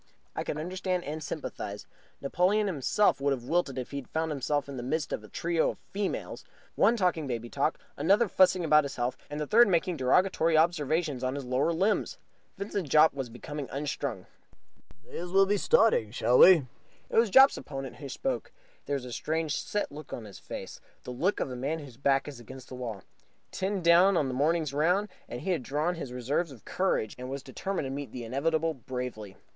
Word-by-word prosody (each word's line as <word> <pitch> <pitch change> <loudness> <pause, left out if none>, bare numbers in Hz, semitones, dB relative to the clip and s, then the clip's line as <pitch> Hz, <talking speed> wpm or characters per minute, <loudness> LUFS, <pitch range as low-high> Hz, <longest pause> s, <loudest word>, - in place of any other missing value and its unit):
I - - -2
could - - -4
understand 180 +2 -2
and 155 +2 -5
sympathize. 105 -9 -5 0.4
Napoleon 185 +9 +2
himself 185 0 +1
would 140 0 +2
have 125 -3 -5
wilted 145 -1 0
if 125 - -5
he 140 - -4
had 140 - -7
found 160 0 -1
himself 145 0 -1
in 140 - -7
the 125 - -4
midst 155 +5 -2
of 105 - -4
a - - -11
trio 165 - 0
of - - -6 0.2
females, 200 0 -3 0.3
one 235 - +3
talking 175 -7 +1
baby 120 -2 -4
talk, 145 +3 0 0.2
another 200 +10 +3
fussing 185 -2 +3
about 150 -1 +5
his 140 -1 -5
health, 120 +1 -1
and 145 +1 -5
the 150 - -1
third 235 +10 +6
making 180 -1 +1
derogatory 160 +4 +3
observations 155 -3 +1
on 130 +1 -1
his 140 -2 -5
lower 130 +6 +1
limbs. 200 - 0 0.4
Vincent 200 -5 -3
Jopp 155 +3 +6
was 135 -3 -4
becoming 140 +4 -7
unstrung. 140 -7 -3 0.8
"May - - -9
as 175 +1 -5
well 195 +2 +5
be 205 +1 +1
starting, 200 - +3
shall 120 +2 +2
we?" 175 -7 +8 0.5
It - - -1
was 230 -1 +3
Jopp's 265 +6 +7
opponent 135 -3 -7
who 140 +1 -8
spoke. 265 - -3 0.4
There 145 - 0
was 135 -2 -4
a 125 - -7
strange, 160 +1 -1
set 205 -6 -2
look 150 +2 -10
on 115 - -6
his 100 - -11
face - - -8 0.2
the - - -6
look 170 +11 0
of 130 - -2
a - - -5
man 140 +6 -2
whose 140 -7 -11
back 135 0 +2
is 140 -4 -8
against 130 +2 -11
the - - -9
wall. 115 -6 -6 0.5
Ten 190 -1 -2
down 175 +3 +6
on 140 -4 +1
the - - -3
morning's 150 +2 +1
round, 180 +8 +2 0.2
he 125 +11 -3
had 170 -6 0
drawn 150 +6 -1
on - - 0
his 140 -6 -6
reserves 135 +7 -1
of 120 -6 -14
courage 180 - 0
and 125 0 -6
was 135 0 -5
determined 185 +5 -4
to 135 - -4
meet 140 0 -5
the 125 - -6
inevitable 160 +7 0
bravely. 125 -6 -6
150 Hz, 205 wpm, -29 LUFS, 130-175 Hz, 0.8 s, we